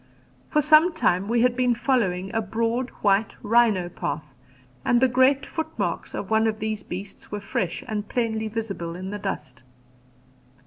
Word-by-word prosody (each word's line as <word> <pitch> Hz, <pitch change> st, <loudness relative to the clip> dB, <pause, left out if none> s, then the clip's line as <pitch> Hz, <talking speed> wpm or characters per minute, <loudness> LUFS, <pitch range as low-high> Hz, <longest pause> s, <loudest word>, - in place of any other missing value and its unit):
For 300 Hz, -1 st, +2 dB
some 310 Hz, +4 st, +6 dB
time 195 Hz, -, +1 dB
we 235 Hz, +1 st, +2 dB
had 250 Hz, 0 st, +3 dB
been 250 Hz, -1 st, +2 dB
following 210 Hz, -7 st, 0 dB
a 225 Hz, -, +1 dB
broad 230 Hz, +4 st, -1 dB
white 200 Hz, +1 st, +2 dB
rhino 215 Hz, -5 st, +3 dB
path, 155 Hz, -4 st, -5 dB, 0.5 s
and 240 Hz, -, +3 dB
the 260 Hz, -, +5 dB
great 260 Hz, +2 st, +3 dB
footmarks, 320 Hz, -, -3 dB
of -, -, -5 dB
one 220 Hz, 0 st, +4 dB
of 215 Hz, -1 st, -1 dB
these 215 Hz, -1 st, -3 dB
beasts 195 Hz, +2 st, -8 dB
were 210 Hz, -, -3 dB
fresh 190 Hz, -3 st, -3 dB
and 210 Hz, -2 st, -3 dB
plainly 220 Hz, -2 st, -1 dB
visible 200 Hz, -6 st, -4 dB
in 185 Hz, +2 st, -6 dB
the 205 Hz, -, -4 dB
dust. 130 Hz, -9 st, -5 dB
220 Hz, 165 wpm, -25 LUFS, 195-245 Hz, 0.5 s, some